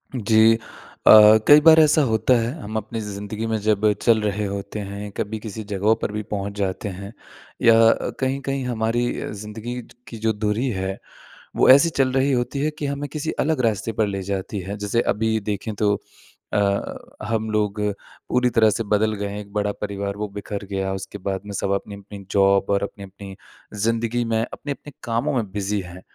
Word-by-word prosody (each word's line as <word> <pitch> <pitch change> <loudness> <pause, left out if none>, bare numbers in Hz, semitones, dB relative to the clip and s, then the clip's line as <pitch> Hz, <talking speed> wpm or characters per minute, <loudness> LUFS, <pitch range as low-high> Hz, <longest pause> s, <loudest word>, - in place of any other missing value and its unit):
जी। 110 -1 +5 0.5
अ, - - +10 0.4
कई 145 +1 +9
बार 160 +1 +8
ऐसा 155 0 +5
होता 110 +3 +2
है 115 +1 -1
हम 110 -1 -7
अपनी 110 +2 -4
ज़िंदगी 105 +1 -5
में 110 0 0
जब 105 0 +2
चल 115 -2 +4
रहे 105 0 -1
होते 100 +1 -5
हैं 100 +1 -6
कभी 110 0 -3
किसी 110 0 -7
जगहों 105 +3 +2
पर - - -2
भी 105 +1 -3
पहुँच 100 0 -4
जाते 100 +1 -2
हैं। 100 +3 -8 0.5
या 115 -1 +6 0.2
अ, - - 0
कहीं-कहीं 135 0 -2
हमारी 120 0 0 0.2
अ, - - -5
ज़िंदगी 110 +4 -6
ज - - -18
की 115 - -8
जो 110 0 0
दूरी 105 +4 -1
है 95 -3 -3 0.6
वो - - +4
ऐसी 140 +6 +7
चल 135 -4 +1
रही 135 +2 +2
होती 125 +2 -1
है 150 +2 0
कि 145 - -2
हमें 140 +1 -3
किसी 150 +2 -3
अलग 155 -3 +1
रास्ते 110 0 -1
पर 110 - +3
ले 100 -1 -3
जाती 100 +1 -3
है। 100 +3 -6
जैसे 105 +3 0
अभी 110 +1 0
देखें 105 +1 -4
तो 105 0 +2 0.6
अ, - - +2 0.7
हम 110 -1 -1
लोग 105 -1 0 0.5
पूरी 125 0 +2
तरह 115 -2 +4
से 115 - -1
बदल 110 +1 +1
गए 100 -1 -3
हैं, 100 +1 -5
एक 100 -1 -10
बड़ा 105 -1 0
परिवार 100 -1 -3
वो 105 0 -3
बिखर 100 0 -5
गया, 95 -1 -3
उसके 95 +1 -6
बाद 95 0 -3
में 105 - -7
सब 100 0 -2
अपनी-अपनी 100 0 -6
जॉब 100 0 +3
और 100 0 +1
अपनी-अपनी 100 -1 -8 0.5
ज़िंदगी 115 +1 0
में, 110 -1 0
अपने-अपने 145 0 -7
कामों 120 +6 -1
में 110 -6 -2
बिज़ी 100 +1 -2
हैं। 90 +1 -11
105 Hz, 195 wpm, -22 LUFS, 100-115 Hz, 0.7 s, अ